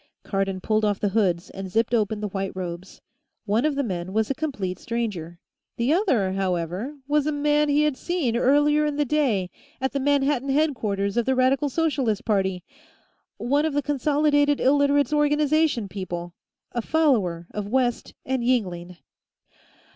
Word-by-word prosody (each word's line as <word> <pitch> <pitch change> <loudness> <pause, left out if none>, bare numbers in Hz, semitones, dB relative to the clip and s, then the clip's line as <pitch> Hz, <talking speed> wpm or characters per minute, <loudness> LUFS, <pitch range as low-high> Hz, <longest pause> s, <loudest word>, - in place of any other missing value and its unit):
Cardon 195 -1 -2
pulled 215 +2 +1
off 205 -2 +1
the 205 - 0
hoods 190 -4 0
and 195 -1 -7
zipped 225 +5 0
open 215 -2 +1
the 210 - -1
white 195 0 -3
robes. 180 0 -7 0.4
One 220 +6 +1
of 305 -2 +1
the 280 - 0
men 185 -4 -4
was 220 +3 +1
a - - +2
complete 255 -11 -4
stranger; 205 -8 -4 0.4
the 240 +6 +2
other, 260 - +1
however, 190 - -2
was 295 0 +1
a - - +1
man 295 0 +2
he 290 +1 +3
had 300 -3 +1
seen, 320 -10 -1
earlier 290 +4 +3
in 295 - -2
the 295 0 +1
day, 240 -11 0 0.3
at 265 0 -1
the 280 - -2
Manhattan 275 -1 +1
headquarters 230 -9 0
of 240 - +1
the 265 - +2
Radical 265 +3 +2
Socialist 270 -8 0
Party. 190 -4 0 0.7
One 280 +5 +1
of 315 -2 -1
the 290 - +1
Consolidated 290 +1 +2
Illiterates' 285 +2 +3
Organization 295 -4 +2
people; 175 -3 -6 0.4
a 240 - -2
follower 220 - +1
of 210 -1 -4
West 245 +1 -1
and 260 -1 -1
Yingling. 180 -8 -1
245 Hz, 160 wpm, -24 LUFS, 195-290 Hz, 0.7 s, he